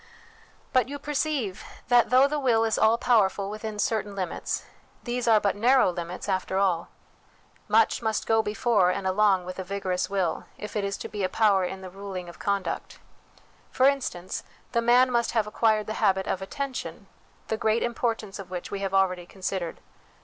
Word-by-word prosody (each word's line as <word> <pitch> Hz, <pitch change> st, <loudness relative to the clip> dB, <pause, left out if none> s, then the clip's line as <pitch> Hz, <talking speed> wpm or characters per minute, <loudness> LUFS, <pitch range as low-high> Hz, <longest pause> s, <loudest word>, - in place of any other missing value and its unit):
But 255 Hz, -1 st, +3 dB
you 285 Hz, -, -4 dB
perceive 285 Hz, -8 st, -2 dB, 0.3 s
that, 240 Hz, -2 st, +5 dB
though 260 Hz, +2 st, +6 dB
the 300 Hz, +1 st, -2 dB
will 235 Hz, -5 st, +3 dB
is 225 Hz, -1 st, +1 dB
all 220 Hz, +1 st, +4 dB
power 230 Hz, -5 st, +4 dB
ful 200 Hz, +1 st, -5 dB
within 215 Hz, 0 st, -5 dB
certain 210 Hz, -1 st, -1 dB
limits, 185 Hz, -3 st, -3 dB, 0.4 s
these 240 Hz, 0 st, -2 dB
are 220 Hz, -2 st, +6 dB
but 200 Hz, -1 st, 0 dB
narrow 245 Hz, 0 st, +4 dB
limits 175 Hz, +2 st, -6 dB
after 190 Hz, -1 st, -1 dB
all. 185 Hz, -4 st, +1 dB, 0.8 s
Much 220 Hz, +2 st, +3 dB
must 220 Hz, -2 st, -1 dB
go 225 Hz, 0 st, +3 dB
before 210 Hz, -3 st, +2 dB
and 185 Hz, +1 st, -2 dB
along 190 Hz, -1 st, +3 dB
with 185 Hz, +1 st, -7 dB
a -, -, -2 dB
vigorous 185 Hz, -1 st, -2 dB
will 190 Hz, -4 st, -1 dB
if 210 Hz, +1 st, -8 dB
it 210 Hz, -, 0 dB
is 200 Hz, 0 st, -2 dB
to -, -, -6 dB
be 205 Hz, -2 st, -4 dB
a 185 Hz, -, +1 dB
power 205 Hz, -2 st, +3 dB
in 190 Hz, +1 st, -5 dB
the 185 Hz, -, -8 dB
ruling 190 Hz, -2 st, -7 dB
of 170 Hz, -, -13 dB
conduct. 200 Hz, -2 st, -2 dB, 0.7 s
For 260 Hz, -, +2 dB
instance, 250 Hz, -10 st, -1 dB, 0.3 s
the 235 Hz, -2 st, +1 dB
man 245 Hz, +2 st, +5 dB
must 235 Hz, -1 st, +1 dB
have 225 Hz, -3 st, +2 dB
acquired 215 Hz, 0 st, +1 dB
the 215 Hz, -, -4 dB
habit 190 Hz, -2 st, +3 dB
of 190 Hz, -, -2 dB
attention, 265 Hz, +7 st, -5 dB, 0.4 s
the 220 Hz, -, +1 dB
great 220 Hz, +1 st, +1 dB
importance 225 Hz, -4 st, -2 dB
of 195 Hz, -, -8 dB
which 180 Hz, -1 st, -6 dB
we 200 Hz, -, -3 dB
have 195 Hz, -1 st, -2 dB
already 185 Hz, -2 st, +1 dB
considered. 185 Hz, -3 st, -4 dB
210 Hz, 185 wpm, -26 LUFS, 190-235 Hz, 0.8 s, though